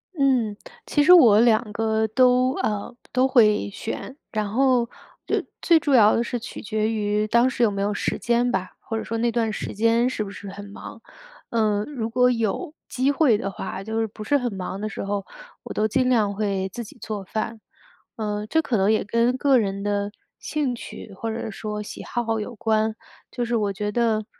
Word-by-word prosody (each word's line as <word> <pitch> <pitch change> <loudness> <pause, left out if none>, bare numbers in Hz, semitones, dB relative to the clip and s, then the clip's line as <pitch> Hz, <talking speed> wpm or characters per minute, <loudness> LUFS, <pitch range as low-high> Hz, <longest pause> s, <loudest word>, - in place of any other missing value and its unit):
嗯， 255 -8 +2 0.3
其 290 - +2
实 360 - +8
我 235 - +8
两 225 -2 +3
个 220 0 +1
都 255 +2 +3
呃， 210 +3 -2 0.2
都 255 +1 +3
会 215 -6 +4
选， 225 +6 -6
然 215 -1 -1
后， 250 -1 +3 0.4
呃， - - +1 0.2
最 335 -2 +5
主 290 -3 0
要 215 -4 +6
的 230 - +1
是 240 0 -3
取 230 - -8
决 215 +1 -1
于 210 -1 0
当 235 +4 +4
时 255 - -4
有 230 - +5
没 200 -1 -3
有 205 +1 0
时 - - -2
间 240 +1 +1
吧， 185 -5 -2
或 225 - -4
者 - - -3
说 230 - -3
那 235 +1 +1
段 225 -1 0
时 - - -5
间 230 +3 +2
是 225 - -2
不 200 - -7
是 200 0 -9
很 200 +1 -8
忙。 220 +2 -10 0.5
呃， 215 -3 +1
如 245 -7 -4
果 250 +1 +3
有 230 +4 -2 0.2
机 260 +3 +1
会 280 -7 +3
的 195 -1 -3
话， 190 +1 -6
就 220 +2 -2
是 225 - 0
不 215 0 -9
是 285 +6 +2
很 245 -5 -2
忙 190 0 -5
的 215 - -2
时 - - -5
候， 200 0 -2 0.4
我 - - -7
都 215 - +1
尽 255 +4 +1
量 215 -5 +2
会 195 -2 -1
自 240 - -5
己 220 - -13
做 210 -3 -5
饭。 220 +3 -4 0.6
嗯， 210 -2 -3
这 320 - +3
可 260 - -1
能 195 +2 +3
也 220 - +2
跟 230 +5 +1
个 275 -1 +4
人 200 -2 -2
的 205 0 -1 0.3
兴 295 -5 -1
趣 225 -3 -9
或 225 +4 -4
者 225 0 -4
说 210 +1 -5
喜 - - -8
好 225 -2 -2
有 235 +3 -6
关， 220 -1 +1 0.4
就 245 - -2
是 235 0 -1
我 210 -3 +1
觉 205 +1 -3
得 220 -1 +1
220 Hz, 225 characters per minute, -24 LUFS, 210-245 Hz, 0.6 s, 实